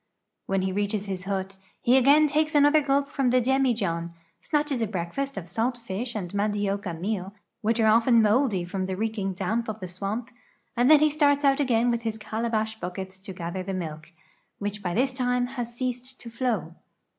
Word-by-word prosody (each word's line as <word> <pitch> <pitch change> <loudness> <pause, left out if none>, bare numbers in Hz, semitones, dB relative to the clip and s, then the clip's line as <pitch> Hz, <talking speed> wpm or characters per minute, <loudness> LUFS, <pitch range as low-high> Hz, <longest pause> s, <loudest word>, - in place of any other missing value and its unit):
" - - -56
When 195 -1 0
he 190 - 0
reaches 205 +1 -1
his 190 -2 -5
hut, 195 0 -3 0.2
he 245 - +3
again 280 +4 +6
takes 305 +1 +1
another 290 +1 +6
gulp 280 0 +1
from 270 -3 +1
the 255 +1 +4
dem.ijohn, 230 -10 0 0.3
snatches 295 -5 0
a 225 - +1
breakfast 205 +8 -3
of 180 -3 -5
salt 230 +7 -1
fish 235 +1 -5
and 185 -4 -4
mandioca 200 -3 -1
meal, 195 +1 -3 0.3
which 225 +2 +1
are 220 - +4
often 230 +2 +5
moldy 215 -4 +2
from 185 +1 -3
the 190 - -2
reeking 215 -3 -2
damp 220 +5 -1
of 215 0 -5
the 185 - -5
swamp, 200 +7 -4 0.4
and 245 +2 +3
then 305 -1 +8
he 305 0 +4
starts 285 -1 +3
out 275 +1 +4
again 245 -3 +2
with 235 -1 -1
his 225 -1 -3
calabash 220 0 -2
buckets 190 +1 -6
to 190 +1 -8
gather 175 0 -5
the 190 +1 -4
milk, 160 -2 -6 0.5
which 205 0 -4
by 180 -3 -2
this 260 +3 +1
time 250 -1 +1
has 245 -2 -5
ceased 255 +1 -4
to 235 - -10
flow. 230 -9 -1
220 Hz, 195 wpm, -26 LUFS, 190-255 Hz, 0.5 s, then